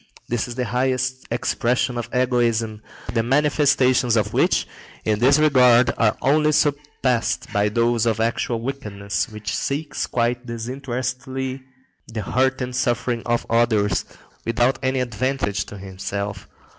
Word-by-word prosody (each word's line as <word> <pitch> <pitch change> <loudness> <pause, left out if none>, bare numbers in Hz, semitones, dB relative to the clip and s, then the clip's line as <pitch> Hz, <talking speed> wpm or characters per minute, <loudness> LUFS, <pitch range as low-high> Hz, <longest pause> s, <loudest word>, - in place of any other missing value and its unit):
This 120 0 -1
is 120 - -7
the 125 0 -1
highest 130 +2 -1
expression 120 +1 0
of 120 -1 -4
egoism, 115 -4 +1 0.3
the 115 - +2
manifestations 135 -2 +3
of 105 -2 0
which - - +2 0.4
in 105 -1 +1
this 135 +5 +5
regard 125 -5 +5
are 110 -2 +2
only 150 +2 +3
surpassed 145 -5 0
by 105 +1 +2
those 115 +1 +1
of 110 -1 +1
actual 115 +1 0
wickedness, 105 -6 -3
which 105 0 -5
seeks, 145 +2 -2
quite 120 +1 -1
disinterestedly, 130 +2 -4 0.5
the 110 -2 -5
hurt 130 +4 +1
and 125 0 -5
suffering 120 -1 0
of 120 0 0
others, 110 -5 +2 0.4
without 120 +2 +1
any 130 -1 0
advantage 115 -4 -1
to - - -9
itself. 100 +1 -5
120 Hz, 130 wpm, -22 LUFS, 115-130 Hz, 0.5 s, this